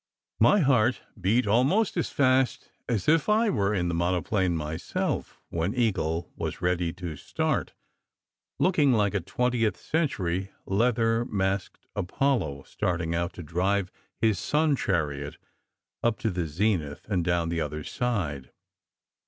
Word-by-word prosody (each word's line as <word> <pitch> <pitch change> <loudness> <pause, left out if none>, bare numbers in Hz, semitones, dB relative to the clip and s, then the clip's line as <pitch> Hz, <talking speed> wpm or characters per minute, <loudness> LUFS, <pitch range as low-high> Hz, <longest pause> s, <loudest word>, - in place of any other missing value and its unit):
My 205 - +5
heart 125 -4 +3 0.2
beat 110 +7 +3
almost 135 - +3
as 170 - 0
fast 130 -2 +2 0.2
as 115 -6 -1
if 160 +5 +3
I 215 0 +4
were 100 -3 +1
in 90 -4 0
the 85 - -1
mono 85 +1 +1
plane 95 -4 +1
myself 80 +2 -3
when 85 +7 -1
Eagle 90 -9 0
was - - -4
ready 90 -1 0
to 90 -3 -6
start, - - -2 0.8
looking 150 -8 +3
like 105 -3 +2
a 100 - +1
twentieth 115 +4 0
century, 95 - -1 0.2
leather 115 +2 +2
masked 95 -3 -2
Apollo 95 - 0
starting 85 -2 -2
out 85 +2 -1
to 85 - -8
drive 95 +5 0 0.3
his 110 -5 +2
sun 150 - +2
chariot 75 - -1 0.6
up 115 -1 +1
to 110 -4 +1
the 90 -2 -2
zenith 80 -3 -1
and 95 -5 0
down 85 -1 +1
the 85 -1 -1
other 75 0 -3
side. 85 - -2
95 Hz, 140 wpm, -27 LUFS, 85-120 Hz, 0.8 s, My